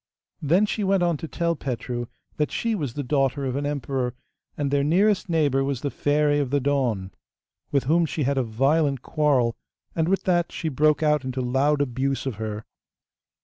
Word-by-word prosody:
Then 175 +8 +3
she 210 0 -2
went 195 -1 +2
on 170 -1 +2
to 160 - -6
tell 170 +1 -1
Petru 120 -3 -4 0.3
that 150 - 0
she 230 -1 -1
was 145 - -3
the 145 - -2
daughter 135 0 0
of 130 -1 -2
an 145 +1 -1
emperor, 135 -3 -2 0.4
and 140 -2 -1
their 140 0 +2
nearest 190 +6 +2
neighbour 145 -5 +2
was 135 -2 -2
the 140 - -2
Fairy 145 +3 +2
of 140 -3 -1
the 145 +2 +2
Dawn, 125 -9 0 0.6
with 140 -2 +2
whom 165 +4 +2
she 155 - -2
had 140 +2 +1
a - - +1
violent 135 +4 +1
quarrel, 135 -6 +1 0.4
and 165 0 +1
with 195 - +1
that 175 -2 +1
she 160 - -3
broke 150 +2 +2
out 150 -2 +2
into 130 0 -4
loud 135 +4 +1
abuse 135 +1 -1
of 130 -6 -3
her. 110 0 -5
145 Hz, 190 wpm, -24 LUFS, 130-155 Hz, 0.6 s, Then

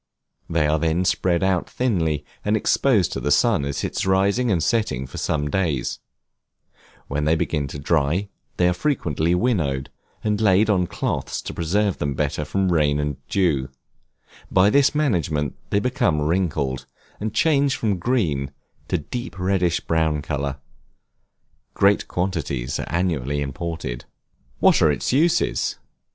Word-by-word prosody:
They 85 -2 +1
are 75 +1 +2
then 80 +3 +1
spread 90 0 +1
out 95 -2 +1
thinly, 80 - 0 0.2
and 105 +1 +2
exposed 110 -5 +2
to - - -3
the 75 - -2
sun 95 - +3
at 70 0 -3
its - - -2
rising 100 +6 +2
and 85 -6 +1
setting 105 - 0
for 65 - -8
some 75 -1 -1
days; 75 -5 -1 1.1
when 75 +2 -2
they 80 +2 +3
begin 75 -3 -1
to 70 - -7
dry, 80 +6 +1 0.3
they 90 - +4
are 90 - +3
frequently 85 - 0
winnowed, 85 - 0 0.3
and 105 0 0
laid 105 +1 +4
on 90 -3 +1
cloths - - -3
to - - -6
preserve 95 +4 0
them 70 -1 -1
better 75 +2 -1
from 95 +4 0
rain 75 -3 +2
and 75 -2 -2
dew; 75 -9 +1 0.8
by 95 +2 +4
this 140 +2 +4
management 80 - 0
they 100 - +2
become 100 -10 +1
wrinkled, 75 -5 -1 0.3
and 110 +1 -4
change 140 -1 +3
from 105 -5 -1
green 85 - 0 0.4
to - - -1
a 75 - -3
deep 120 -5 -6
reddish 90 -2 +1
brown 80 -3 0
color. 70 -2 -3 1.2
Great 100 +1 +3
quantities 80 -9 -2
are - - -5
annually 75 -6 -1
imported. 70 -3 -4 0.6
What - - +5
are 80 - +5
its 75 - -1
uses? 165 +5 +2
85 Hz, 150 wpm, -22 LUFS, 75-100 Hz, 1.2 s, What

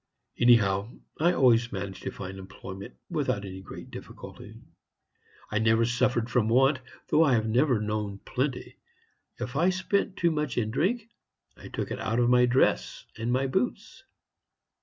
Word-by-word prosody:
Anyhow, 110 -3 +4 0.2
I 170 +3 +4
always 120 -5 +4
managed 95 -1 -5
to - - -4
find 95 0 -7
employment 95 -4 -9 0.2
without 100 0 -1
any 95 0 -8
great 95 - -10
difficulty. - - -10 1.0
I 110 - +1
never 110 +1 +3
suffered 120 -1 +1
from 110 -2 +1
want, 135 +4 +4 0.3
though 160 - +5
I 135 -5 +4
have 110 -1 +1
never 125 +1 +3
known 105 -1 -3
plenty. 130 +5 -3 0.6
If 125 +2 -5
I 170 +6 +3
spent 190 +1 0
too 170 -1 +2
much 150 -5 -2
in 110 -3 0
drink, 210 - 0 0.5
I - - -12
took - - -4
it - - -3
out 115 +3 -1
of 120 0 +3
my 125 0 +5
dress 120 - +1
and 115 +2 -2
my 130 +2 +1
boots. 210 - -2
120 Hz, 160 wpm, -28 LUFS, 105-135 Hz, 1.0 s, though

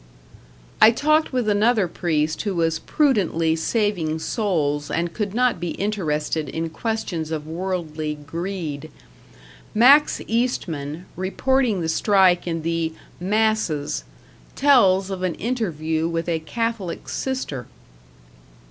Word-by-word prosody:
I 215 - +10
talked 305 +6 +2
with 250 -4 -1
another 210 -1 +3
priest 155 -3 -1
who 200 -3 -2
was 165 -1 +1
prudently 180 - +1
saving 170 -3 0
souls 155 - -1
and 170 0 -1
could 210 -2 -3
not 250 -5 +2
be 175 -1 -3
interested 155 -7 -1
in 165 0 -3
questions 200 -7 -3
of 155 -2 -3
worldly 160 -3 -3
greed. 155 0 -5 0.9
Max 275 +7 +6
Eastman, 175 - -2
reporting 220 +3 +1
the 165 - -1
strike 185 +1 +3
in 165 -2 -2
the 165 -1 -1 0.3
"Masses", 195 - 0 0.5
tells 200 -9 +4
of 190 -1 -4
an 185 -3 -1
interview 165 -9 -1
with 165 0 -2
a 165 -2 0
Catholic 225 +1 -3
sister. 205 - -3
180 Hz, 115 wpm, -22 LUFS, 160-220 Hz, 0.9 s, I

